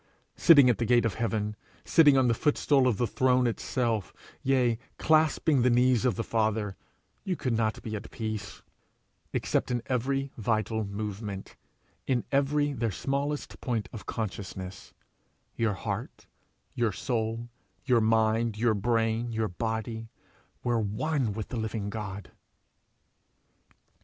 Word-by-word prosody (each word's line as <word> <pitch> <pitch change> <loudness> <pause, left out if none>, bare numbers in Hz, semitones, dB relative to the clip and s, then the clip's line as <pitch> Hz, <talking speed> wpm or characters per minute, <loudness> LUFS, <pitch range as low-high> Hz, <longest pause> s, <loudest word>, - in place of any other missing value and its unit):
Sitting 145 -6 +7
at 120 - +3
the 120 - +1
gate 120 0 +4
of 110 - 0
heaven, 110 -1 -1 0.3
sitting 150 -5 +6
on 130 -1 +4
the 115 - +3
footstool 140 +1 +2
of 115 -5 +1
the 120 - +1
throne 125 +1 +2
itself, 115 -3 -1 0.3
yea, 125 -4 +2 0.2
clasping 155 -3 +3
the 125 - +4
knees 125 0 +3
of 125 - +2
the 115 - -2
Father, 110 -3 0 0.5
you 185 - -1
could 130 -6 -2
not 110 -1 0
be 110 -1 -4
at 110 +1 -7
peace, 110 -3 -5 0.7
except - - 0
in 125 - +1
their 115 +1 -8
every 135 +2 0
vital 110 0 0
movement, 100 -1 -5 0.5
in 125 -3 +1
every 145 +1 +2
their 115 -3 -1
smallest 140 +8 -3
point 110 -7 -2
of 110 - -8
consciousness, 95 -3 -5 0.6
your 115 -3 +1
heart, 95 - -5 0.5
your 115 -3 +1
soul, 115 +2 -2 0.4
your 125 -4 +4
mind, 110 0 +2
your 115 0 +3
brain, 115 +2 0
your 110 -1 -1
body, 110 +3 -3 0.5
were 120 -2 +1
one 115 +4 -1
with 105 0 -5
the 125 - -4
living 110 -2 -3
God. 100 -2 -6
115 Hz, 140 wpm, -28 LUFS, 110-125 Hz, 0.7 s, Sitting